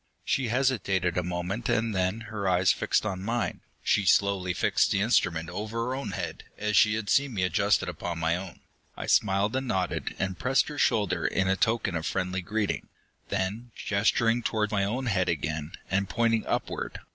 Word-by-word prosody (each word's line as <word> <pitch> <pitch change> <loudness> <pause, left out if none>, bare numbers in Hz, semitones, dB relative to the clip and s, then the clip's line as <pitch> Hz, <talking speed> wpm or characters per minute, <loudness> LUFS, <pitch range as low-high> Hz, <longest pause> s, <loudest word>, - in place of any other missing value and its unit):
She 130 -3 +1
hesitated 110 -8 +1
a 90 - +2
moment, 90 +6 -3
and 115 0 +1
then, 95 +3 0
her 105 -3 -3
eyes 90 0 +4
fixed - - +1
on 95 -3 -3
mine, 115 +4 -2 0.2
she 105 - +2
slowly 95 -1 +3
fixed 85 - +2
the 100 - +1
instrument 90 -7 +2
over 110 +6 -5
her 115 +2 -1
own 135 +1 -4
head - - -5
as 105 0 -1
she 105 -1 +5
had 110 -2 -3
seen 140 0 +2
me 95 - 0
adjust 100 +2 +2
it - - -4
upon 85 -1 -4
my 80 0 +1
own. 90 -1 -7 0.4
I - - -4
smiled 100 +3 +2
and 130 0 -1
nodded, 95 -5 -1
and 95 -1 -2
pressed 135 +2 +2
her 145 -1 -6
shoulder 90 -5 +2
in 95 0 +1
token 110 -5 +1
of 80 -1 -2
friendly 95 0 -1
greeting. 105 +2 -2 0.4
Then, 110 +6 -3
gesturing 115 +3 +1
toward 110 -2 0
my 100 -2 +1
own 125 +6 -2
head 95 -6 +1
again, 80 0 -2 0.2
and 100 0 +1
pointing 115 -1 +1
upward. - - -2
100 Hz, 185 wpm, -28 LUFS, 90-115 Hz, 0.4 s, she